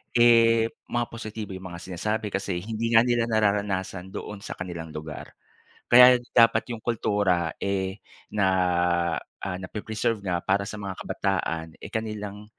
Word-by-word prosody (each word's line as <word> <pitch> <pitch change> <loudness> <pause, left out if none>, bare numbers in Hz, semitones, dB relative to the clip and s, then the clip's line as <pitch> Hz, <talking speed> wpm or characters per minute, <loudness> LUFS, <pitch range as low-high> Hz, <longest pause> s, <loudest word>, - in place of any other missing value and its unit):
eh 115 -1 +5 0.2
mga 120 0 0
positibo 110 -3 -6
yung 95 0 -7
mga 85 - -8
sinasabi. 105 +4 -2
Kasi 95 -3 -2
hindi 115 +2 -2
nga 115 0 +7
nila 120 -1 +1
nararanasan 100 -4 0
doon 105 -1 -6
sa - - -7
kanilang 85 -3 -7
lugar. 75 -1 -8 0.5
Kaya 125 0 +8 0.2
dapat 115 +1 +5
'yong 115 -2 -6
kultura 100 -7 +1
eh 95 -1 -2 0.3
na 105 -2 +1 1.0
ah, 95 -1 -3
nape-preserve 110 +3 -3
nga 90 -3 -1
para 95 +3 +1
sa 105 - -6
mga 100 -2 -5
kabataan 85 -5 -2
eh - - -8
kanilang 105 -2 -5
105 Hz, 145 wpm, -26 LUFS, 95-115 Hz, 1.0 s, Kaya